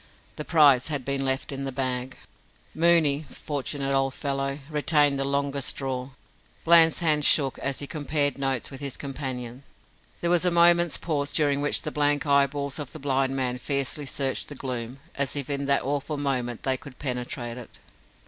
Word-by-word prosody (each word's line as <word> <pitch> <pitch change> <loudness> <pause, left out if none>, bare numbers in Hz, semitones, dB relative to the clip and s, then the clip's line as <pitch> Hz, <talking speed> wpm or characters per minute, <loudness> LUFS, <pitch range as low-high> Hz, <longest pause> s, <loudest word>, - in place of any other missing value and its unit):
The 150 - -5
prize 145 -6 +5
had 145 -5 -3
been 140 0 -1
left 130 +1 -1
in 135 0 -4
the 135 - -3
bag. 130 -1 -3 0.6
Mooney 160 -3 +4
fortunate 140 -1 -3
old 135 -1 +1
fellow 140 -1 -2
retained 150 -2 +2
the - - +1
longest 140 0 -1
straw. 130 -1 -2 0.6
Bland's 165 0 +6
hand 155 -3 +2
shook 140 -3 +3
as 140 -1 -2
he 145 - -4
compared 145 -2 -1
notes 135 -2 -1
with 135 - -8
his 140 -2 -3
companion. 130 -3 -5 0.6
There 170 - 0
was 175 -1 +3
a 180 - +3
moment's 170 -1 +4
pause, 145 -4 -2
during 145 -2 +1
which 145 - 0
the 155 - -4
blank 145 0 +1
eyeballs 140 0 +1
of 145 -3 -6
the - - -6
blind 135 -2 0
man 125 -2 -1
fiercely 140 +1 -1
searched 135 -1 -2
the 145 - -7
gloom, 125 -1 -5
as 140 -1 -1
if 140 0 -3
in 140 0 -2
that 140 0 +2
awful 145 +2 -2
moment 125 -5 -2
they 130 -1 +1
could 130 0 -13
penetrate 125 -2 -4
it. 120 - -12
140 Hz, 175 wpm, -26 LUFS, 135-145 Hz, 0.6 s, Bland's